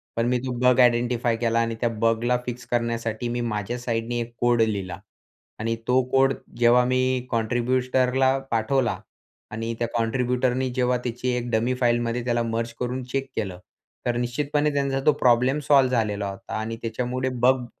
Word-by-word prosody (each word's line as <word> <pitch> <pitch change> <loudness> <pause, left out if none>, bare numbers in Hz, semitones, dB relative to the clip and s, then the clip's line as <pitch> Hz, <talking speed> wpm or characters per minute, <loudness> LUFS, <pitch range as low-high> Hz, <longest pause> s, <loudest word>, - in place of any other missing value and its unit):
पण 115 +1 +1
मी 125 +1 +2
तो 130 - -2
बग 125 0 +4
आइडेंटिफाई 120 -1 +3
केला 115 0 +1
आणि 115 0 0
त्या 120 - +2
बगला 115 +2 +2
फिक्स 125 0 -6
करण्यासाठी 115 -1 -1
मी 120 0 -2
माझ्या 115 0 -2
साईडने 120 0 -2
एक 120 0 -5
कोड 120 -1 +3
लिहिला 100 -5 -1 0.6
आणि 115 +1 -1
तो 125 +1 +4
कोड 135 0 +4 0.2
जेव्हा 120 +1 +5
मी 130 0 0
कॉन्ट्रिब्युटरला 125 +3 +1
पाठवला 120 +3 +1 0.5
आणि 115 +1 -3
त्या 120 - 0
कॉन्ट्रिब्युटरनी 125 +2 0
जेव्हा 125 -1 +2
त्याची 125 +1 -3
एक 120 0 -4
डमी 115 +3 +1
फाईलमध्ये 120 0 +1
त्याला 120 -1 +1
मर्ज 115 0 -2
करून 125 +1 -2
चेक 135 0 -2
केलं, 95 -5 -3 0.5
तर 120 - 0
निश्चितपणे 145 +5 0
त्यांचा 140 -1 0
तो 150 - +7
प्रॉब्लेम 125 +3 +3
सॉल्व्ह 135 -3 +5
झालेला 105 -4 0
होता. 95 0 -9
आणि 110 +1 -3
त्याच्यामुळे 125 +3 -2
बग 125 +1 +2
120 Hz, 160 wpm, -24 LUFS, 115-125 Hz, 0.6 s, तो